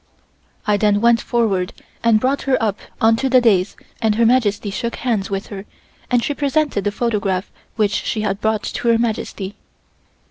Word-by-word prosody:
I 210 -1 +2
then 205 0 +2
went 235 +1 +4
forward 200 -6 0 0.3
and 230 -2 +4
brought 265 +4 0
her 260 - +4
up 210 -3 -1 0.2
onto 225 +4 +3
the 255 0 +6
dais 210 -6 +2 0.3
and 220 -2 +2
Her 230 +1 +3
Majesty 215 -4 +2
shook 235 +4 -3
hands 225 -6 -1
with 195 0 -3
her 200 -1 -7 0.4
and 245 -2 +2
she 290 - -1
presented 285 -6 0
the 205 - +1
photograph 205 -4 -1 0.2
which 210 -2 0
she 215 - -2
had 200 -1 -2
brought 220 -1 0
to - - -4
Her 230 -1 +5
Majesty. 215 -4 -3
220 Hz, 175 wpm, -19 LUFS, 205-235 Hz, 0.4 s, the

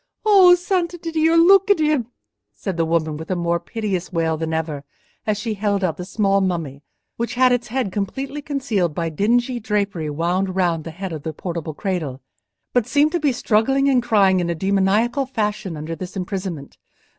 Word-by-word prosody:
"O 380 -4 +7
Santiddio! 340 -3 0
look 385 +4 +6
at 405 - +5
him," 300 -6 +1 0.5
said 195 -3 -4
the 165 -1 +1
woman, 160 -2 0
with 160 +1 -9
a 185 - 0
more 170 0 0
piteous 195 -1 -4
wail 165 -2 0
than 160 0 -3
ever, 160 -3 -3 0.4
as 210 -1 +1
she 215 +2 -3
held 200 -1 -1
out 170 -4 0
the 180 - -6
small 195 0 +1
mummy, 165 -7 -2 0.4
which 235 +1 -3
had 255 0 +4
its 245 -1 0
head 245 -4 -2
completely 265 +9 -4
concealed 235 - -1
by 165 -1 -1
dingy 240 - +1
drapery 200 -7 -1
wound 180 +5 -1
round 170 -4 0
the - - -5
head 180 +2 -6
of 155 - -5
the 160 +2 -5
portable 165 -2 -5
cradle, 165 -10 -3 0.5
but 245 -2 +2
seemed 290 +4 +3
to 345 - 0
be 295 -3 +2
struggling 250 +3 +2
and 260 -3 +3
crying 200 -5 +3
in 175 -1 -1
a 170 - -1
demoniacal 200 - +1
fashion 210 -7 -2
under 155 +2 -5
this 185 +3 -7
imprisonment. 185 -6 -5
195 Hz, 185 wpm, -21 LUFS, 170-250 Hz, 0.5 s, O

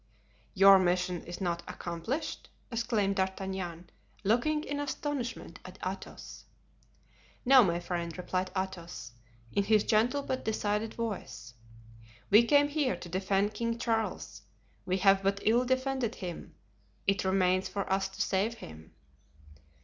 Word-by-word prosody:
"Your 195 0 +8
mission 180 -1 +1
is 175 - -7
not 170 -3 -1
accomplished?" 175 - -4 0.2
exclaimed 225 -4 0
D'Artagnan, 190 -2 -3 0.3
looking 245 +9 +2
in 285 -1 -3
astonishment 285 -3 -4
at - - -11
Athos. - - -7 1.0
"No, 260 0 +8
my 170 -3 +1
friend," 170 -2 -4
replied 185 +1 -2
Athos, 175 - -5 0.4
in 200 - +2
his 215 0 +4
gentle 245 +6 +2
but 260 -1 -3
decided 215 0 -1
voice, 200 - -5 0.8
"we 215 +4 +8
came 290 +3 +4
here 290 -8 0
to 175 0 -9
defend 195 +3 0
King 230 +1 -2
Charles; 225 -2 -2 0.5
we 185 +1 +1
have 195 0 +5
but 195 +1 +1
ill 235 +4 +3
defended 260 -2 0
him—it 105 - -5
remains 185 0 +2
for 200 -1 -3
us 195 0 0
to 195 - -2
save 205 +5 0
him!" 80 - -12
195 Hz, 125 wpm, -30 LUFS, 180-230 Hz, 1.0 s, Your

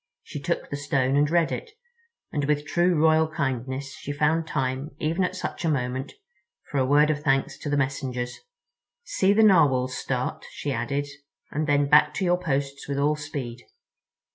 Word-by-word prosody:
She - - -7
took 170 +4 -2
the 145 - -2
stone 140 -2 0
and 145 +1 +3
read 170 -1 +2
it, - - -4 0.6
and 145 -2 -1
with 150 0 0
true 175 +3 +2
royal 160 0 +4
kindness 135 -2 -3
she 145 - -6
found 160 +3 +1
time, 135 +1 -2
even 165 +5 0
at 185 0 -1
such 185 - -5
a 165 - +1
moment, 130 -1 -2 0.6
for 140 - 0
a 130 - +3
word 150 +2 +5
of 145 -1 -3
thanks 135 -2 +1
to 145 - -5
the 145 - +1
messengers. 130 -3 -2 0.6
"See 195 - +2
the 220 +2 +5
Narwhals 140 -10 +4
start," 130 -1 -3
she 145 - -4
added, 140 +3 -1 0.5
"and 155 +1 -1
then 145 -1 +3
back 150 +1 +5
to 190 - -1
your 180 0 +2
posts 140 -4 -2
with 140 0 -2
all 145 +2 +2
speed. 140 -6 -6
145 Hz, 180 wpm, -25 LUFS, 135-155 Hz, 0.6 s, word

